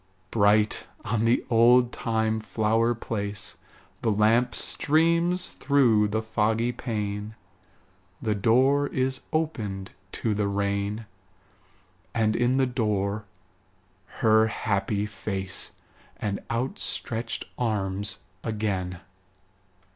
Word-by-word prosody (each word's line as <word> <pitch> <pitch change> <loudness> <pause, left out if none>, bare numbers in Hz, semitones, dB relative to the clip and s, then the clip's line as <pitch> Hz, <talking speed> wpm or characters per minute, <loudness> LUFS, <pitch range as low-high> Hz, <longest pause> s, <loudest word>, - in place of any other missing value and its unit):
Bright 105 0 +3 0.2
on 110 +1 0
the 115 +2 +2
oldtime 115 -2 +3
flower 115 +2 +1
place 105 -3 -4 0.5
The 115 - +1
lamp 115 +4 +3
streams 170 +4 +1
through 120 -7 +3
the 110 +2 -1
foggy 110 +2 +1
pane; 105 -3 -4 0.8
The 110 -2 0
door 130 +8 +3
is 130 -1 -1
opened 110 -12 -2 0.2
to 110 - -1
the 105 0 0
rain: 100 +2 -1 1.1
And 110 -2 +2
in 120 +2 +2
the 135 - +4
door 105 -4 -1 1.0
her 110 0 +5
happy 100 -1 -1
face 95 -2 -2 0.4
And 100 -2 -2
outstretched 115 -1 -2
arms 100 -4 -1 0.2
again. 95 -5 -2
110 Hz, 95 wpm, -26 LUFS, 105-120 Hz, 1.1 s, her